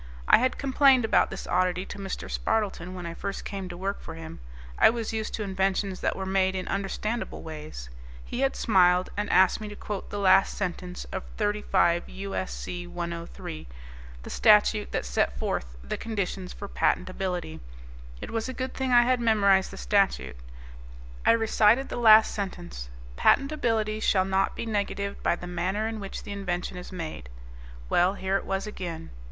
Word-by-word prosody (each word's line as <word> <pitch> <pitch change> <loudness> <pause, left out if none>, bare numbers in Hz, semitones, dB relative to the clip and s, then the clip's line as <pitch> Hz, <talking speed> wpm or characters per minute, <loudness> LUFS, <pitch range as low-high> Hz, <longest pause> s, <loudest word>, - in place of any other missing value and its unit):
I - - +7
had 255 +2 +1
complained 270 -2 +4
about 220 - +3
this - - -6
oddity 180 0 +1
to 205 - -8
Mr. 195 -1 -5
Spardleton 200 -4 -1
when 180 -1 -6
I 170 - -4
first 200 +3 -5
came 195 -2 -5
to 175 - -7
work 195 +2 -3
for - - -8
him; 165 0 -9 0.4
I - - +8
was 225 -1 -3
used 220 -1 -2
to 215 - -3
inventions 190 0 -1
that - - 0
were 190 - -4
made 190 0 +1
in 185 - -3
understandable 210 +4 -3
ways. 150 - -8 0.3
He - - -5
had 270 0 +1
smiled 180 -3 +3
and 205 0 -2
asked 190 +3 +4
me 215 - -5
to 210 - -8
quote 205 -1 -6
the 205 - -5
last 195 -1 +4
sentence 180 -1 -4
of - - -4
35 205 -5 +1
U.S.C. 185 -2 -5
103, 170 - -6 0.6
the - - -8
statute - - +4
that - - -2
set - - 0
forth - - -3
the 65 - -4
conditions 195 -4 -3
for 200 - -7
patentability. 180 -3 -1 0.6
It - - -6
was 225 +2 -2
a - - -4
good 260 0 -3
thing 265 -1 -2
I 240 -1 +7
had 250 +1 +2
memorized 200 -5 +4
the - - -10
statute. - - +1 0.9
I - - +8
recited 225 +3 +3
the - - -4
last 220 -2 +7
sentence, 175 - -5 0.3
"Patentability 225 -7 +2
shall 185 -3 +3
not 190 0 +1
be - - -4
negatived 200 -2 -2
by - - +2
the 175 - -9
manner 180 +5 -1
in 225 -1 -4
which 195 -1 -6
the 205 - -8
invention 180 -3 -3
is 180 0 -8
made." 160 - -6 0.6
Well, 180 - +3
here 190 0 -1
it - - -6
was 195 +1 -2
again. 175 -6 -6
195 Hz, 175 wpm, -27 LUFS, 175-215 Hz, 0.9 s, I